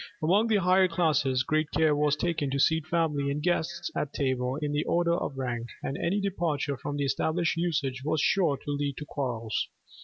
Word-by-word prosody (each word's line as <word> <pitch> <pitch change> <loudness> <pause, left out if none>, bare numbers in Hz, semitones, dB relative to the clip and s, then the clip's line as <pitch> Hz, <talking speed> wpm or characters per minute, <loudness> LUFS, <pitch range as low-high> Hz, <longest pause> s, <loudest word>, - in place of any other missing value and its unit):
Among 200 +8 +3
the 220 - +2
higher 185 -1 +4
classes 150 -7 +1
great 155 +2 0
care 155 -1 +3
was 150 0 +2
taken 155 -2 -1
to 140 +1 -1
seat 160 +2 +2
family 155 -4 0
and 140 +1 -1
guests 170 +1 -1
at 145 - -2
table 130 -2 0
in 150 -1 -2
the 145 +1 0
order 170 0 +2
of 155 -5 -2
rank; 120 -3 -3 0.2
and 135 - -2
any 190 +8 0
departure 165 -8 -1
from 145 +2 -5
the 140 - 0
established 165 +5 0
usage 145 -7 -1
was 155 +1 0
sure 160 -3 +2
to 145 - -6
lead 145 -1 -2
to 150 - -6
quarrels. 120 -7 -2
150 Hz, 195 wpm, -28 LUFS, 140-170 Hz, 0.2 s, higher